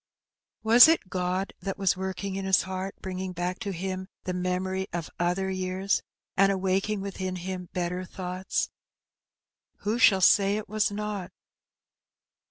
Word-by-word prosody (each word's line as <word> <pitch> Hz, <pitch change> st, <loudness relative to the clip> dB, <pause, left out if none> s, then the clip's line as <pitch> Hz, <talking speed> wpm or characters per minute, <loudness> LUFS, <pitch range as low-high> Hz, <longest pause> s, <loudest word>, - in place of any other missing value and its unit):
Was 235 Hz, +5 st, +9 dB
it 320 Hz, -, +2 dB
God 185 Hz, +1 st, -1 dB
that 195 Hz, -1 st, -3 dB
was 195 Hz, -3 st, +2 dB
working 190 Hz, +1 st, -4 dB
in 195 Hz, -, -3 dB
his 190 Hz, -1 st, +3 dB
heart, 190 Hz, +1 st, -4 dB
bringing 185 Hz, 0 st, -4 dB
back 180 Hz, +1 st, -3 dB
to 205 Hz, -, -4 dB
him 185 Hz, +1 st, -4 dB, 0.2 s
the 185 Hz, -, -2 dB
memories 185 Hz, +1 st, -1 dB
of 170 Hz, -2 st, -4 dB
other 180 Hz, +2 st, 0 dB
years, 185 Hz, +1 st, 0 dB, 0.3 s
and 195 Hz, +1 st, +5 dB
awaking 195 Hz, +2 st, 0 dB
within 190 Hz, -1 st, -4 dB
him 180 Hz, 0 st, -5 dB
better 180 Hz, 0 st, -2 dB
thoughts? 185 Hz, 0 st, -3 dB, 1.1 s
Who 215 Hz, +4 st, -1 dB
shall 195 Hz, -6 st, +6 dB
say 200 Hz, +2 st, +5 dB
it 215 Hz, -, -5 dB
was 215 Hz, 0 st, +1 dB
not 205 Hz, -2 st, -4 dB
190 Hz, 145 wpm, -27 LUFS, 185-195 Hz, 1.1 s, Was